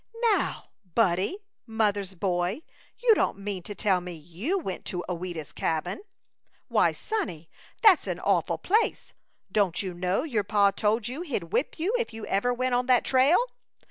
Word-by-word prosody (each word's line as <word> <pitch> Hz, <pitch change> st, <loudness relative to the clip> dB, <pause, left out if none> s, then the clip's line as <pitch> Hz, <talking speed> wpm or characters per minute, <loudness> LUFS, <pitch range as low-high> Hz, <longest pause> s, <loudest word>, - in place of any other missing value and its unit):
"Now, -, -, -2 dB, 0.2 s
Buddie 200 Hz, -, +2 dB, 0.3 s
mother's 205 Hz, -4 st, 0 dB
boy 180 Hz, -, -1 dB, 0.3 s
you 480 Hz, -2 st, +5 dB
don't 405 Hz, -, +1 dB
mean 200 Hz, -2 st, -4 dB
to 205 Hz, +4 st, -7 dB
tell 195 Hz, -4 st, +2 dB
me 180 Hz, 0 st, -7 dB
you 175 Hz, -, -3 dB
went 190 Hz, -, -4 dB
to 175 Hz, -1 st, -3 dB
Ouida's 175 Hz, -3 st, -5 dB
Cabin? 165 Hz, -, -2 dB, 0.7 s
Why, -, -, +4 dB
sonnie, 250 Hz, -, -4 dB, 0.3 s
that's 410 Hz, -7 st, +6 dB
an -, -, -2 dB
awful -, -, +1 dB
place! 435 Hz, +5 st, 0 dB, 0.4 s
Don't 200 Hz, -3 st, +1 dB
you 185 Hz, -2 st, -4 dB
know 180 Hz, +6 st, 0 dB
your 235 Hz, -10 st, -1 dB
pa 200 Hz, -1 st, +3 dB
told 215 Hz, +2 st, 0 dB
you 260 Hz, +7 st, -5 dB
he'd 210 Hz, -, -4 dB
whip 245 Hz, +6 st, 0 dB
you 360 Hz, +8 st, 0 dB
if 450 Hz, -, -3 dB
you 225 Hz, -, -6 dB
ever 200 Hz, +6 st, +1 dB
went 255 Hz, +1 st, -1 dB
on 245 Hz, +1 st, +1 dB
that 250 Hz, -2 st, +4 dB
trail?" 270 Hz, +6 st, +5 dB
205 Hz, 165 wpm, -27 LUFS, 180-255 Hz, 0.7 s, that's